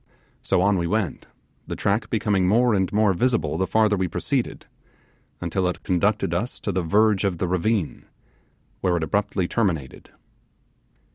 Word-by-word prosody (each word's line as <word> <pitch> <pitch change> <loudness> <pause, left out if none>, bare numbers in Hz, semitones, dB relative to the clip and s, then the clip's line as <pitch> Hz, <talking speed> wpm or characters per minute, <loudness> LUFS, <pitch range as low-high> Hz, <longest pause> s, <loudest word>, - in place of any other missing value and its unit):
So - - +1
on 100 -1 +3
we 85 - -1
went, 100 -2 -2 0.4
the - - -4
track 105 +1 0
becoming 100 -4 +1
more 120 +4 +3
and 95 -2 +1
more 105 -1 +3
visible 120 +2 0
the 95 - +1
farther 110 0 +3
we 95 -1 0
proceeded, - - -2 0.7
until 90 +2 -1
it 90 - -4
conducted 100 0 +1
us 110 +9 -2
to 100 - -2
the 95 0 0
verge 105 +4 +2
of 95 -4 0
the 90 - -1
ravine, 90 +1 -1 0.7
where 90 -2 +1
it 80 - -2
abruptly 95 +2 -1
terminated. 85 - -2
95 Hz, 155 wpm, -23 LUFS, 90-105 Hz, 0.7 s, on